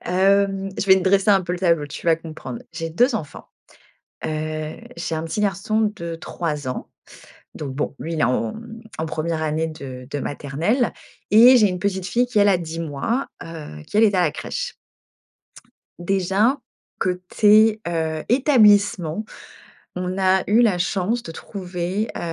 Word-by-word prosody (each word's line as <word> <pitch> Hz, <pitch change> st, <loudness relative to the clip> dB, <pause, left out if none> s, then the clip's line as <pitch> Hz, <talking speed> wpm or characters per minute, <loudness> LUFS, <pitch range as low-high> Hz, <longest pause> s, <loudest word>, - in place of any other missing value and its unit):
Hem, 195 Hz, +1 st, +2 dB
je -, -, -1 dB
vais 190 Hz, -, +8 dB
te 190 Hz, -, 0 dB
dresser 195 Hz, +2 st, +3 dB
un 195 Hz, -2 st, +4 dB
peu 175 Hz, 0 st, -3 dB
le 180 Hz, -, -3 dB
tableau, 170 Hz, -5 st, +2 dB
tu 145 Hz, -, -9 dB
vas 165 Hz, -, +5 dB
comprendre. 155 Hz, -7 st, -8 dB
J'ai 165 Hz, -, -4 dB
2 245 Hz, -, +3 dB
enfants, 155 Hz, -9 st, -6 dB, 0.8 s
heu. 155 Hz, 0 st, -3 dB, 0.2 s
J'ai 165 Hz, -, -3 dB
un 155 Hz, -, -2 dB
petit 165 Hz, +6 st, -3 dB
garçon 210 Hz, +2 st, 0 dB
de 170 Hz, -4 st, -6 dB
3, 150 Hz, -5 st, -4 dB, 0.7 s
donc 140 Hz, -3 st, -5 dB
bon, 145 Hz, +1 st, -3 dB
lui, 165 Hz, -, -4 dB
il 160 Hz, -, -2 dB
est -, -, +2 dB
en 125 Hz, -2 st, 0 dB, 0.5 s
en 160 Hz, -, -1 dB
première 160 Hz, +1 st, -2 dB
année 155 Hz, +1 st, 0 dB
de 130 Hz, -5 st, -8 dB
de 145 Hz, -, -2 dB
maternelle 160 Hz, -, -1 dB, 0.4 s
et 240 Hz, +5 st, +8 dB
j'ai 210 Hz, -4 st, +4 dB
une 180 Hz, -, -4 dB
petite 190 Hz, -1 st, -1 dB
fille 245 Hz, +5 st, +1 dB
qui, 245 Hz, -, -2 dB
elle, 205 Hz, 0 st, +5 dB
a 190 Hz, -, +4 dB
10, 165 Hz, -, -3 dB, 0.2 s
heu, 155 Hz, -, -9 dB
qui, -, -, -3 dB
elle, 220 Hz, -, +6 dB
est 210 Hz, -2 st, +4 dB
à 180 Hz, -, +3 dB
la 165 Hz, -4 st, +2 dB
crèche. -, -, -5 dB, 1.2 s
Déjà, 195 Hz, +7 st, +1 dB, 0.4 s
côté, 210 Hz, +4 st, +3 dB
heu, 160 Hz, -2 st, -2 dB
établissement, 210 Hz, -, +3 dB, 0.7 s
on 180 Hz, +1 st, -3 dB
a 190 Hz, 0 st, +3 dB
eu 220 Hz, +3 st, +5 dB
la 215 Hz, -7 st, +3 dB
chance 195 Hz, +6 st, 0 dB
de 165 Hz, -, -8 dB
trouver, 185 Hz, +2 st, -4 dB
heu, -, -, -4 dB
180 Hz, 165 wpm, -22 LUFS, 160-205 Hz, 1.2 s, vais